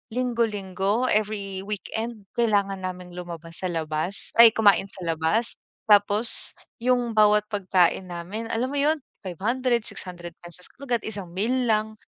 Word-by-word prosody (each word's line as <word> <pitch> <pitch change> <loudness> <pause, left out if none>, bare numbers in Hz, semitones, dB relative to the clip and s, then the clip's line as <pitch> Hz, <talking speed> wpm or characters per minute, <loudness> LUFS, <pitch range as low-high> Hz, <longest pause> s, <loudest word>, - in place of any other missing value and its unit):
linggo-linggo, 220 -2 0
every 200 -2 -1
weekend 215 +2 -4 0.2
kailangan 200 -4 +2
naming 180 -1 -6
lumabas 170 -2 -8
sa 185 - -2
labas, 160 +3 -2
ay 235 -1 +11
kumain 200 -3 +4
sa 195 - -12
labas. 165 +9 0 0.3
Tapos 205 +2 +3 0.3
yung 245 -1 +1
bawat 210 0 +5
pagkain 185 -2 +2
namin 185 +7 -5
alam 245 +3 -1
mo 285 - -3
'yon 300 +3 +3 0.3
500, 235 +6 -1
600 175 -2 -8
pesos 175 +1 -9
kagad 245 -5 -3
isang 200 -5 -5
meal 245 +5 0
lang 215 0 0
205 Hz, 135 wpm, -25 LUFS, 185-230 Hz, 0.3 s, ay